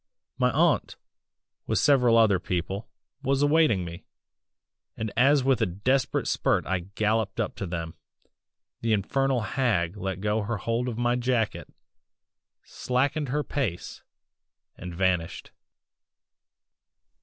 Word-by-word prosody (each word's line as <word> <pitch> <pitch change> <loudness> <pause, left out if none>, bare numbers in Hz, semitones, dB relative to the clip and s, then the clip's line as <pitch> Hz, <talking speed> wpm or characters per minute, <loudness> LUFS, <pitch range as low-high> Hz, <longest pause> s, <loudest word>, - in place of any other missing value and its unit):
"My - - +3
aunt, - - +1 0.7
with - - 0
several 125 -5 +4
other 105 -5 +4
people, 95 +3 -3 0.3
was 135 +2 +1
awaiting 145 - +3
me, 85 +2 -8 0.9
and 110 -1 -3
as 135 +3 +4
with 130 -2 +2
a 110 - +3
desperate 125 +9 0
spurt - - +1
I 95 0 0 0.2
galloped 110 -1 0
up - - -1
to 95 - -4
them, 85 -1 -4 0.9
the 115 -1 +1
infernal 130 +5 +1
hag 105 -8 0
let 95 -1 -4
go 105 +2 0
her 110 +2 -3
hold 115 +5 -2
of 115 - -5
my 120 0 +1
jacket, 120 -3 -1 0.9
slackened 140 +3 -1
her 150 +3 0
pace 125 -14 -4 0.7
and 90 -1 -8
vanished." 90 -2 -1
110 Hz, 120 wpm, -26 LUFS, 95-130 Hz, 0.9 s, several